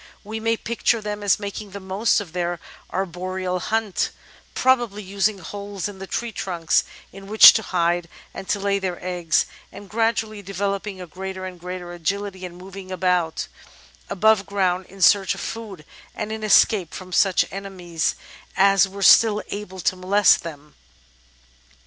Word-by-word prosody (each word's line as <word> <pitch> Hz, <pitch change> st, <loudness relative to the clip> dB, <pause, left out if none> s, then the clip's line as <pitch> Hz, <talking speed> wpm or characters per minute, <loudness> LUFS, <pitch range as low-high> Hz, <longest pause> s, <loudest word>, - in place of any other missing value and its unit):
We 220 Hz, +2 st, -5 dB
may 225 Hz, +1 st, 0 dB
picture 235 Hz, +1 st, 0 dB
them 210 Hz, -1 st, -5 dB
as 205 Hz, 0 st, +2 dB
making 205 Hz, 0 st, -6 dB
the 200 Hz, +1 st, -8 dB
most 195 Hz, +5 st, +1 dB
of 185 Hz, -6 st, -8 dB
their 175 Hz, -1 st, -2 dB, 0.3 s
arboreal 185 Hz, 0 st, -3 dB
haunt, 220 Hz, +1 st, -1 dB, 0.5 s
probably 240 Hz, -5 st, +2 dB
using 200 Hz, +2 st, 0 dB
holes 200 Hz, 0 st, -6 dB
in 200 Hz, -2 st, -10 dB
the 195 Hz, -, -7 dB
tree 235 Hz, +6 st, -3 dB
trunks 175 Hz, -6 st, 0 dB, 0.3 s
in 195 Hz, 0 st, -11 dB
which 215 Hz, +2 st, +10 dB
to 220 Hz, -, 0 dB
hide 175 Hz, -3 st, 0 dB, 0.2 s
and 195 Hz, -, -8 dB
to 205 Hz, -, +1 dB
lay 200 Hz, 0 st, 0 dB
their 185 Hz, -2 st, -3 dB
eggs, 175 Hz, -3 st, +1 dB, 0.3 s
and 205 Hz, -, -11 dB
gradually 220 Hz, -1 st, -1 dB
developing 200 Hz, 0 st, -3 dB
a 180 Hz, -, -6 dB
greater 185 Hz, +2 st, -7 dB
and 185 Hz, -1 st, -8 dB
greater 180 Hz, 0 st, -7 dB
agility 190 Hz, +2 st, -3 dB
in 175 Hz, -1 st, -9 dB
moving 190 Hz, +1 st, -10 dB
about 180 Hz, -3 st, 0 dB, 0.6 s
above 215 Hz, 0 st, +3 dB
ground 185 Hz, -2 st, 0 dB
in 195 Hz, 0 st, -5 dB
search 195 Hz, +2 st, +5 dB
of -, -, -9 dB
food, 205 Hz, -9 st, -7 dB, 0.3 s
and 215 Hz, 0 st, -4 dB
in 220 Hz, 0 st, -5 dB
escape 205 Hz, -4 st, +4 dB
from 185 Hz, -1 st, -9 dB
such 195 Hz, 0 st, +3 dB
enemies 185 Hz, -4 st, -3 dB, 0.4 s
as 195 Hz, 0 st, +5 dB
were 195 Hz, +1 st, -6 dB
still 215 Hz, +1 st, +6 dB
able 200 Hz, -2 st, -6 dB
to 185 Hz, -, +1 dB
molest 190 Hz, +3 st, +4 dB
them. 150 Hz, -3 st, -10 dB
195 Hz, 160 wpm, -23 LUFS, 180-205 Hz, 0.6 s, which